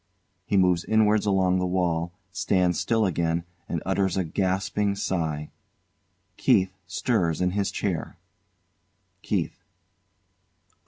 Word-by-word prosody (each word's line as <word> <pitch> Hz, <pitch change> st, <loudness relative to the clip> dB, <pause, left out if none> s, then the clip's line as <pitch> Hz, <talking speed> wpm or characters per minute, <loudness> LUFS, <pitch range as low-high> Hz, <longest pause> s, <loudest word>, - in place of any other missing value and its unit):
He 100 Hz, -, +2 dB
moves 90 Hz, -2 st, +3 dB
inwards 110 Hz, -1 st, +3 dB
along 95 Hz, -2 st, +3 dB
the 90 Hz, -, 0 dB
wall, 85 Hz, -2 st, 0 dB, 0.2 s
stands 90 Hz, -3 st, +1 dB
still 110 Hz, -2 st, +2 dB
again 85 Hz, -2 st, 0 dB, 0.3 s
and 85 Hz, -, -2 dB
utters 95 Hz, 0 st, +1 dB
a 95 Hz, -, +2 dB
gasping 95 Hz, +3 st, 0 dB
sigh. 80 Hz, -6 st, -2 dB, 0.9 s
KEITH 95 Hz, 0 st, +3 dB, 0.2 s
stirs 90 Hz, -5 st, 0 dB
in 90 Hz, 0 st, +1 dB
his 100 Hz, +1 st, 0 dB
chair.] 95 Hz, -6 st, -3 dB, 1.0 s
KEITH. -, -, -2 dB
95 Hz, 110 wpm, -26 LUFS, 85-100 Hz, 1.0 s, moves